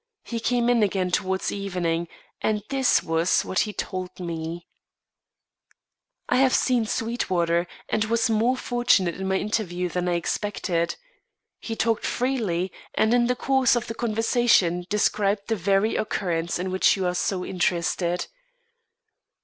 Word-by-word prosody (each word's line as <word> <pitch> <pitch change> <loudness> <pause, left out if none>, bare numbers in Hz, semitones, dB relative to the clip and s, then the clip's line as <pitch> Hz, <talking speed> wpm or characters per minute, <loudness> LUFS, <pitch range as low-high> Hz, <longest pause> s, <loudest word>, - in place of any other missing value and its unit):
He 235 - -4
came 240 +1 +1
in 245 -2 +3
again 190 -3 +1
towards 190 +1 0
evening, 175 -4 -2 0.3
and 210 -1 0
this 270 -2 +2
was 165 +2 +1
what 185 - -1
he 210 - 0
told 185 -2 -5
me: 170 -1 -5 1.6
"I - - +2
have 260 -1 +4
seen 245 -4 +2
Sweetwater, 180 -8 0 0.2
and 220 0 0
was 230 +2 +1
more 230 +3 +2
fortunate 240 -9 +2
in 190 +2 -5
my 190 - +1
interview 180 -4 -2
than 180 +1 -1
I 175 - +1
expected. 170 -1 -1 0.6
He 225 - -5
talked 225 0 0
freely, 215 -9 -1 0.2
and 220 +2 +3
in 240 -1 +3
the 250 - +1
course 265 -1 +2
of 240 - -1
the 225 - -5
conversation, 225 -6 +2
described 205 0 +1
the 225 - +2
very 195 +3 +1
occurrence 170 -5 -1
in 185 +1 -3
which 185 +2 +3
you 190 - -1
are 180 - +1
so 180 0 -1
interested. 175 0 0
195 Hz, 145 wpm, -25 LUFS, 180-230 Hz, 1.6 s, have